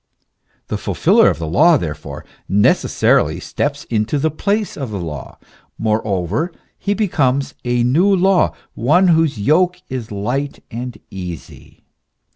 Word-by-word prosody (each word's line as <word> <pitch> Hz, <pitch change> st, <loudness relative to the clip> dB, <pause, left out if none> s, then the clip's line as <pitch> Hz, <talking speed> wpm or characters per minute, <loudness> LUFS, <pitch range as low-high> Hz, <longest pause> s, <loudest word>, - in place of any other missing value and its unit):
The -, -, -2 dB
fulfiller -, -, +3 dB
of -, -, -2 dB
the 80 Hz, -, -4 dB
law, 155 Hz, -, +5 dB
therefore, 75 Hz, -, -6 dB, 0.2 s
necessarily 100 Hz, +2 st, +2 dB
steps 145 Hz, 0 st, -3 dB
into 110 Hz, +5 st, -1 dB
the 155 Hz, +3 st, 0 dB
place 200 Hz, +7 st, -1 dB
of 135 Hz, -5 st, -5 dB
the 105 Hz, -, -4 dB
law; 75 Hz, -6 st, -7 dB, 0.4 s
moreover 110 Hz, -, -1 dB, 0.3 s
he 205 Hz, 0 st, -1 dB
becomes 140 Hz, -10 st, 0 dB
a 120 Hz, -1 st, +1 dB
new 145 Hz, +11 st, +3 dB
law, 190 Hz, -1 st, +3 dB, 0.2 s
one 175 Hz, +10 st, +3 dB
whose 160 Hz, -5 st, +3 dB
yoke 175 Hz, -, +2 dB
is 125 Hz, -5 st, -5 dB
light 125 Hz, +8 st, -3 dB
and 120 Hz, 0 st, -6 dB
easy. 90 Hz, -3 st, -9 dB
130 Hz, 130 wpm, -18 LUFS, 105-165 Hz, 0.4 s, law